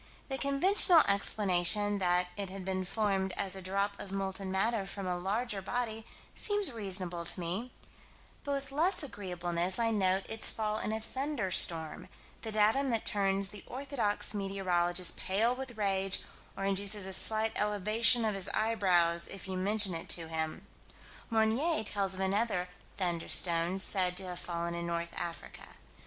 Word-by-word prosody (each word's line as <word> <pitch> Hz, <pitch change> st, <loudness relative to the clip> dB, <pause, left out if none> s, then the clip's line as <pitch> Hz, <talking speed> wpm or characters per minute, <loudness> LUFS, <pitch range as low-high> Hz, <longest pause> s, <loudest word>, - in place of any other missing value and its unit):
The 270 Hz, 0 st, -4 dB
conventional 330 Hz, +4 st, +6 dB
explanation 200 Hz, 0 st, +2 dB
that 180 Hz, -1 st, +1 dB
it 200 Hz, -2 st, -4 dB
had 190 Hz, -1 st, -8 dB
been 190 Hz, -1 st, -3 dB
formed 195 Hz, -2 st, -1 dB
as 195 Hz, -1 st, +1 dB
a 190 Hz, -, -6 dB
drop 200 Hz, +2 st, -3 dB
of 195 Hz, -, -8 dB
molten 195 Hz, 0 st, -4 dB
matter 200 Hz, +1 st, -1 dB
from 195 Hz, 0 st, -6 dB
a 180 Hz, -1 st, -2 dB
larger 200 Hz, +4 st, -3 dB
body 225 Hz, +1 st, -4 dB, 0.3 s
seems 410 Hz, -6 st, +3 dB
reasonable 185 Hz, -6 st, -1 dB
to 170 Hz, -, +1 dB
me; 185 Hz, +9 st, -4 dB, 0.7 s
but 285 Hz, -, -3 dB
with 275 Hz, 0 st, -5 dB
less 325 Hz, +5 st, +1 dB
agreeableness 180 Hz, -6 st, -2 dB
I 230 Hz, -1 st, 0 dB
note 190 Hz, -2 st, 0 dB
its 220 Hz, 0 st, -1 dB
fall 215 Hz, -1 st, -3 dB
in -, -, -3 dB
a 220 Hz, -, -2 dB
thunderstorm, 190 Hz, -, +2 dB, 0.3 s
the 220 Hz, -, -6 dB
datum 220 Hz, +6 st, +2 dB
that 230 Hz, -3 st, -1 dB
turns 195 Hz, -1 st, +1 dB
the 210 Hz, 0 st, -9 dB
orthodox 255 Hz, -7 st, -2 dB
meteorologist 185 Hz, -3 st, 0 dB
pale 220 Hz, +6 st, 0 dB
with 255 Hz, -2 st, -8 dB
rage, 195 Hz, -2 st, 0 dB, 0.3 s
or 195 Hz, -, -4 dB
induces 200 Hz, +1 st, +2 dB
a 190 Hz, -, -5 dB
slight 220 Hz, +3 st, +3 dB
elevation 215 Hz, +3 st, +3 dB
of 215 Hz, -, -1 dB
his 195 Hz, -1 st, -3 dB
eyebrows, 180 Hz, -6 st, +1 dB
if 195 Hz, -, -5 dB
you 190 Hz, -, -5 dB
mention 200 Hz, +1 st, +3 dB
it 165 Hz, -, -5 dB
to 165 Hz, -2 st, -1 dB
him. 160 Hz, -1 st, -4 dB, 0.6 s
Meunier 230 Hz, +7 st, 0 dB
tells 200 Hz, -2 st, 0 dB
of 190 Hz, -, -6 dB
another 190 Hz, -2 st, -1 dB, 0.3 s
"thunderstone" 175 Hz, 0 st, +2 dB
said 185 Hz, -2 st, +1 dB
to 195 Hz, -, +1 dB
have 180 Hz, -1 st, -6 dB
fallen 170 Hz, 0 st, -5 dB
in 170 Hz, 0 st, -5 dB
North 170 Hz, 0 st, -4 dB
Africa. 170 Hz, 0 st, -8 dB
195 Hz, 160 wpm, -30 LUFS, 185-220 Hz, 0.7 s, conventional